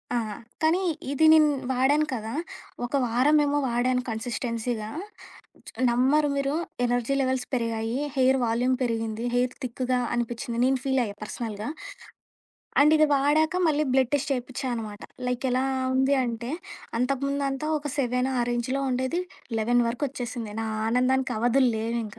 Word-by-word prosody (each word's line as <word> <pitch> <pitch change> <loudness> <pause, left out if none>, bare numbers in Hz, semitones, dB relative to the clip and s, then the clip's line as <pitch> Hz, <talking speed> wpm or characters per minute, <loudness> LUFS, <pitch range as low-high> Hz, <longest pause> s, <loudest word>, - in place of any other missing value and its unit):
ఆ! - - +3 0.4
కానీ 320 +3 +3 0.3
ఇది 285 +3 +3
నేను 310 -1 +6 0.2
వాడాను 270 +4 +3
కదా! 225 -2 -4 0.5
ఒక 240 - -9
వారమేమో 290 +5 +3
వాడాను 250 +1 +1
కన్సిస్టెన్సీగా 230 -1 -3 1.0
నమ్మరు 265 +5 +3
మీరు 275 0 0 0.3
ఎనర్జీ 245 +2 0
లెవెల్స్ 260 -1 0
పెరిగాయి. 230 -1 -1 0.2
హెయిర్ 265 0 +4
వాల్యూమ్ 245 +3 +1
పెరిగింది. 225 -1 -2
హెయిర్ 245 0 +1
థిక్‌గా 250 0 -1
అనిపించింది. 240 0 -3
నేను 265 0 +2
ఫీల్ 265 -1 +2
అయ్యా 200 -2 -6
పర్సనల్‌గా. 215 0 -5 1.1
అండ్ 300 +2 +6
ఇది 310 0 +5
వాడాక 300 +4 +2
మళ్ళీ 305 0 +2
బ్లడ్ 260 -2 +3
టెస్ట్ 285 0 0
చేపించానమాట. 245 -4 -4 0.3
లైక్ 250 +1 -1
ఎలా 255 +1 +2 0.3
ఉంది 265 +2 +3
అంటే 235 0 -4 0.5
అంతకుముందంత 275 +2 -1 0.2
ఒక 295 - -8
సెవెను 250 0 +1
ఆ - - +3
రేంజ్‌లో 240 +3 -1
ఉండేది 260 +8 0 0.4
11 240 +2 +3
వరకు 240 +5 -2
ఒచ్చేసింది. 240 -4 -5
నా - - -3 0.2
ఆనందానికి 255 +2 +2
అవధులు 245 +2 +3
లేవింక. 225 -1 -3
250 Hz, 135 wpm, -26 LUFS, 235-275 Hz, 1.1 s, నేను